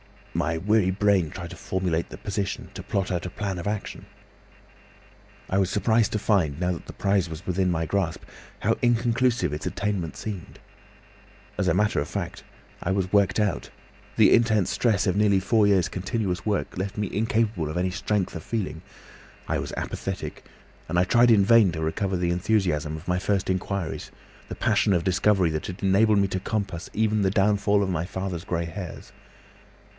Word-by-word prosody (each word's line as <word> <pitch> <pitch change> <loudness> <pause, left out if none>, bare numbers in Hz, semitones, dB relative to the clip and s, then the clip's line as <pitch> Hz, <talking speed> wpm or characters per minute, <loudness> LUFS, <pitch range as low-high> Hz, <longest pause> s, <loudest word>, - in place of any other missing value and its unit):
My 80 -1 0
weary 100 +2 +2
brain 95 -4 +2
tried 85 +1 -7
to - - -7
formulate 90 -3 -2
the - - -9
position, 100 -1 -3
to - - -7
plot 100 -1 -2
out 90 -1 -2
a - - -5
plan 95 -1 -4
of 85 - -5
action. 105 0 -4 1.4
"I 95 - +2
was 95 -2 +2
surprised 110 +2 +2
to 105 - 0
find, 90 -9 +1
now 90 0 +1
that 85 - -6
my - - -8
prize 100 -3 +1
was 80 +3 -8
within 90 0 +1
my 80 -2 0
grasp, 90 -2 -1 0.4
how - - +2
inconclusive 120 - +2
its 75 - -4
attainment 100 -5 -2
seemed. 100 -6 -6 1.0
As - - +1
a - - +4
matter 105 +2 +2
of 70 - -2
fact - - -5 0.4
I 90 - -1
was 95 -1 -1
worked 100 +1 +3
out; 105 -6 0 0.5
the - - +6
intense 110 -5 +3
stress 105 -5 +1
of 95 -2 +1
nearly 100 -2 +3
four 105 +2 +3
years' 95 -2 +3
continuous 95 -1 -2
work 100 -4 -1
left 95 +3 -3
me 105 -2 -1
incapable 110 -6 0
of 75 - -4
any 90 +1 0
strength 100 +1 -1
of 85 - -5
feeling. 95 -5 -3 0.7
I - - 0
was - - -5
apathetic, - - -5 0.4
and 90 - 0
I 90 - +5
tried 120 +6 +4
in 105 -4 +5
vain 115 -4 +6
to 80 - -4
recover 95 +4 -1
the 90 -1 0
enthusiasm 90 -5 0
of 80 - -10
my 90 0 +1
first 95 0 0
inquiries, 95 -2 -3 0.4
the - - -6
passion 100 - +2
of 85 -2 +1
discovery 95 -1 +2
that 75 0 -3
had 90 +2 -7
enabled 105 +3 +4
me 100 0 +3
to 95 - -2
compass 100 -4 -3
even 110 -1 +1
the 95 - +3
downfall 100 0 +3
of 95 - -2
my 85 -2 -1
father's 95 -2 -4
grey 85 -1 -1
hairs. 85 +2 -7
95 Hz, 185 wpm, -25 LUFS, 90-105 Hz, 1.4 s, the